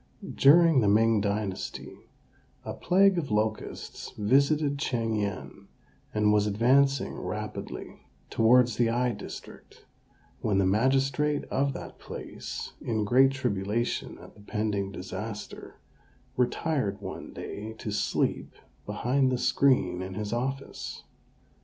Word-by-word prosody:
During 160 0 +6
the 105 - +2
Ming 110 +1 +4
dynasty 100 -1 -3 0.7
a - - -4
plague 190 0 +3
of 150 - -4
locusts 110 0 -2
visited 140 +6 +2
Ch'ing 115 -6 -1
yen, 100 -1 -5 0.4
and 105 0 +2
was 105 0 +3
advancing 130 +6 +2
rapidly - - -6 0.2
towards 120 +1 +4
the 120 -2 +3
I 120 +1 +1
district, 105 - -10 0.5
when 105 -3 0
the 100 - +3
magistrate 135 +7 +2
of 140 +1 +1
that - - -9
place, - - -7
in 110 -2 -1
great 130 +5 +5
tribulation 115 -3 -2
at - - -14
the 105 - -17
pending 105 -2 -2
disaster, 105 +3 -7 0.6
retired 125 -4 0
one - - -7
day 110 +2 -7
to 110 - -6
sleep - - -1 0.3
behind 130 +6 +1
the 125 - +1
screen 125 -8 +2
in 95 0 -6
his 105 +1 -3
office. 135 +3 -4
115 Hz, 120 wpm, -28 LUFS, 105-135 Hz, 0.7 s, During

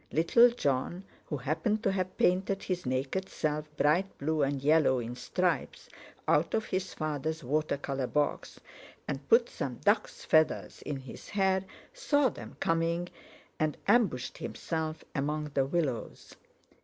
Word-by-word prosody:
Little 235 +10 +6
Jon, 170 - -1 0.2
who 150 - -2
happened 185 - -1
to 195 - +3
have 185 -1 -2
painted 190 +2 +2
his 180 -6 -3
naked 135 +9 -1
self 150 0 -2
bright 160 +7 +2
blue 155 +2 0
and 140 0 +1
yellow 145 -1 +4
in 120 0 -4
stripes 180 +8 -1 0.4
out - - +3
of 220 - 0
his 185 0 -3
father's 155 0 -2
water 150 +4 0
colour 135 -2 -3
box, 150 +2 -1 0.5
and - - -5
put 475 +1 +6
some - - -4
duck's - - 0
feathers 155 0 +2
in 145 - -4
his 130 -3 -11
hair, 190 -1 +1 0.3
saw 290 - +2
them - - -10
coming, 165 +1 0 0.5
and—ambushed 155 - +1
himself 160 -1 -3
among 150 +1 -2
the 135 - +2
willows. 145 -6 -3
160 Hz, 140 wpm, -30 LUFS, 140-190 Hz, 0.5 s, Little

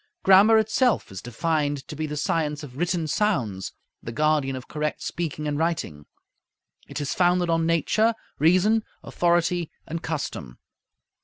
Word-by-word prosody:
Grammar 200 +4 +7
itself 220 - +1
is 95 - -7
defined 145 +2 -2
to 155 - -7
be 155 +1 -3
"the 150 0 -5
science 150 0 -1
of 130 -4 -10
written 175 +2 -1
sounds, 140 - -1 0.3
the 115 - -6
guardian 150 0 +1
of 130 -1 -8
correct 150 0 -3
speaking 150 -2 -4
and 145 0 -2
writing. 160 - -2 0.8
It - - -6
is 145 -1 -2
founded 175 -1 +2
on 165 0 +1
nature, 215 +7 +2 0.2
reason, 185 +8 +4 0.2
authority, 175 -1 +1 0.2
and 165 +1 -5
custom." 145 - -5
160 Hz, 145 wpm, -25 LUFS, 145-175 Hz, 0.8 s, Grammar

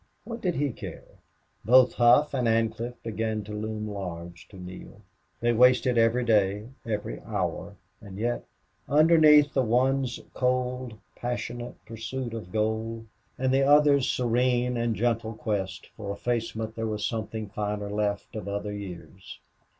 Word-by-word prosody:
What 230 -1 -7
did 180 -3 0
he 145 -1 0
care? - - -10 0.4
Both 125 +2 +6
Hough 125 +6 +5
and 125 -3 +1
Ancliffe 115 +2 0
began 110 -1 -2
to 105 - -8
loom 110 0 -4
large 85 -4 -7
to 100 - -14
Neale. 90 0 -10 0.4
They 120 0 +2
wasted 125 +1 +5
every 115 +2 +3
day, 105 -1 +2 0.2
every 105 -2 -3
hour; - - -3 0.3
and 100 -3 -10
yet, 120 +3 -1 0.5
underneath 150 -1 +6
the 135 - +3
one's 130 +1 +1
cold, 125 -2 -1 0.2
passionless 120 0 -4
pursuit 120 +2 -5
of 105 -6 -7
gold, 110 +1 -1 0.3
and 130 0 +1
the 135 - +4
other's 145 -1 +5
serene 125 0 +1
and 115 -1 0
gentle 115 0 0
quest 105 -3 -3
for 100 -2 -5
effacement 110 0 -3
there 115 0 -2
was 105 -1 -2
something 110 -1 -4
finer 105 0 -3
left 105 0 -2
of 105 -3 -5
other 100 +1 -3
years. 95 -1 -9
115 Hz, 140 wpm, -27 LUFS, 105-125 Hz, 0.5 s, Both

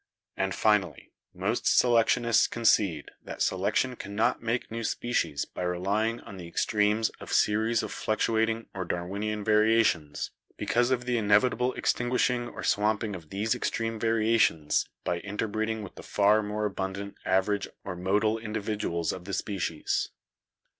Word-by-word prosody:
"And - - -1
finally, 95 -9 +1 0.2
most 100 +6 -2
selectionists 120 -1 +4
concede 100 -9 +2
that - - -3
selection 130 -1 0
cannot 100 0 -1
make 115 +1 -2
new 115 0 -4
species 85 -11 -1
by - - -8
relying 100 +6 0
on 100 - -10
the 90 -2 -8
extremes 105 +5 +1
of - - -9
series 110 +2 +2
of - - -5
fluctuating 110 +1 0
or 95 - -3
Darwinian 100 +5 -3
variations, 110 -8 +2 0.3
because 120 +1 +1
of 125 -2 0
the 125 -1 +1
inevitable 120 +4 +3
extinguishing 125 0 0
or - - -8
swamping 105 0 +1
of 80 -4 -11
these 105 +3 0
ex - - -1
treme 115 -1 -3
variations 110 -9 +2
by 85 - -1
interbreeding 110 +2 -2
with 95 - -9
the - - -11
far 105 +1 +3
more 105 0 -2
abun 95 -1 -3
dant 100 0 -7
average 95 +2 +1 0.2
or - - -5
modal 105 +5 +1
individuals 105 -6 -2
of 90 -1 -8
the 100 - -6
species." 95 -5 -2
105 Hz, 145 wpm, -28 LUFS, 95-115 Hz, 0.3 s, selectionists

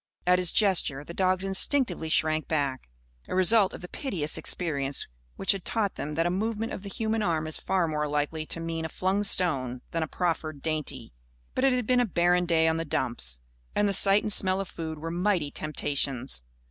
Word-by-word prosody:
At 180 0 +4
his 180 -2 +4
gesture, 175 -9 +2
the 170 - -9
dogs 185 0 +1
instinctively 195 - +2
shrank 155 0 +1
back 140 - -2 0.4
a - - -4
result 190 +2 +6
of - - -9
the 180 - -6
piteous 175 - -3
experience 140 -5 -1 0.3
which - - +2
had 195 -3 -2
taught 210 -4 -1
them 150 +1 -5
that 165 +2 +1
a 175 - +1
movement 220 +4 -2
of - - -6
the 200 - -8
human 220 +1 -2
arm 165 -5 0
is 155 - -2
far 185 -3 0
more 150 -1 -1
likely 150 +2 -2
to - - -1
mean 165 -1 -4
a 160 - -4
flung 190 +4 -1
stone 135 -11 +1
than 165 - -2
a 160 - -1
proffered 155 -4 -3
dainty. 155 - -3 0.4
But 260 - +1
it 270 - +4
had 250 -2 -1
been 250 +2 +3
a 245 - +3
barren 175 -1 +2
day 160 -1 +3
on 160 0 +1
the 165 - -2
dumps. 120 - 0 0.3
And 205 - +2
the 200 - 0
sight 195 +2 +4
and 215 - +3
smell 185 -1 +3
of 195 - -3
food 160 -1 -6
were 165 +2 -5
mighty 175 -4 0
temptations. 140 - -1
170 Hz, 210 wpm, -27 LUFS, 155-195 Hz, 0.4 s, result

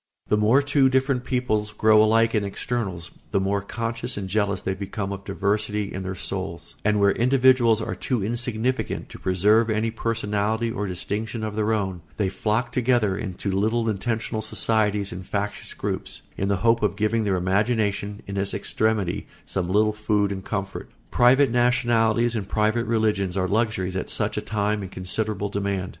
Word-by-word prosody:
The - - +4
more 115 +7 +4
two 140 -1 +3
different 130 -1 +1
peoples 110 -5 0
grow 110 0 +5
alike 115 +1 +3
in 105 -3 +2
externals 100 -5 -3 0.2
the - - +1
more 100 +1 0
conscious 115 +3 -3
and 100 -2 -3
jealous 100 -1 0
they 95 - -1
become 100 +1 -4
of 100 0 -6
diversity 105 +1 -1
in 95 - -4
their 95 0 -4
souls; 85 -3 -5
and 105 0 +2
where 100 0 +5
individuals 125 -2 +4
are - - -3
too 125 -6 -2
insignificant 120 +2 -2
to - - -10
preserve 105 +5 +3
any 110 +1 0
personality 110 0 -1
or 105 -3 -3
distinction 105 +5 -3
of 110 -1 -3
their 110 0 +1
own, 95 -5 -1 0.2
they 100 -3 +1
flock 110 +5 -1
together 120 -5 +2
into 95 -1 -4
little 110 +4 +1
intentional 110 +1 -2
societies 105 -2 0
and 90 +1 -8
factious 105 0 -3
groups, - - -4
in 95 - -1
the 100 -1 +1
hope 115 0 +4
of 105 -1 +1
giving 110 +2 +1
their 100 -2 +1
imagination, 100 +2 0
in 100 0 -5
its 100 0 -1
extremity, 110 -5 -1 0.2
some 90 -2 -2
little 105 +2 +3
food 105 -1 0
and 95 -1 -5
comfort. 95 -2 -4 0.2
Private 130 +1 +5
nationalities 120 -1 +2
and 100 -3 -3
private 110 +2 +1
religions 105 -5 +1
are 95 -1 +1
luxuries 100 -3 0
at 95 - -3
such - - 0
a - - -1
time 105 0 -1
in 95 - -6
considerable 100 +2 -2
demand. 100 -2 -2
105 Hz, 175 wpm, -24 LUFS, 100-115 Hz, 0.2 s, grow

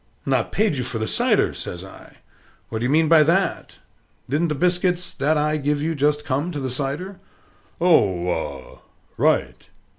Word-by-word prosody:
"Not - - 0
paid 210 -9 +1
you 125 - -1
for 120 -2 -2
the 110 0 -2
cider!" - - +2
says 90 +2 -6
I. 95 - -15 0.5
"What 110 - -3
do 120 - -2
you - - 0
mean 160 +3 +3
by 160 0 +6
that? 170 +6 0 0.5
Didn't 150 +6 0
the 150 - -2
biscuits 180 +2 0
that 150 +3 +1
I 150 +1 +1
give 145 0 -1
you 160 +3 -1
just 150 0 0
come 145 +6 -1
to 145 - -3
the 130 -2 -3
cider?" 145 +9 -3 0.6
"Oh, 100 - +3
ah, 75 -6 -4 0.4
right!" 60 0 0
145 Hz, 175 wpm, -22 LUFS, 125-165 Hz, 0.6 s, by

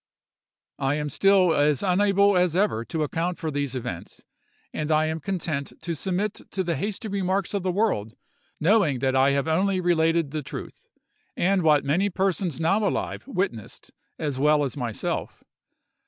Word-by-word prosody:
"'I 135 +1 +1
am 150 -1 -2
still 185 +2 +4
as 145 -2 +2
unable 200 +1 +3
as 180 -2 +2
ever 190 - +1
to 160 +2 -2
account 170 +4 -2
for 160 -3 -3
those 140 -2 -2
events, 95 -9 -6 0.5
and 155 0 -3
I 155 0 +3
am 160 +1 -2
content 155 -5 -3
to 170 - -4
submit 190 +5 -2
to 190 - -2
the 170 -2 -1
hasty 205 - -3
remarks 195 -1 -1
of 200 - 0
the 185 0 -1
world, 150 - 0 0.4
knowing 165 - +3
that 130 +1 0
I 135 +1 +5
have 140 +1 0
only 185 +4 +1
related 165 -3 +2
the 155 0 -3
truth, 135 - -9 0.5
and 190 +1 +2
what 150 -3 +4
many 175 +9 +2
persons 185 -3 -1
now 165 +7 +2
alive - - -3
witnessed 180 - -4 0.3
as 145 -4 -3
well 150 +1 +4
as 135 - -3
myself. 120 -6 -4
165 Hz, 165 wpm, -25 LUFS, 145-190 Hz, 0.5 s, I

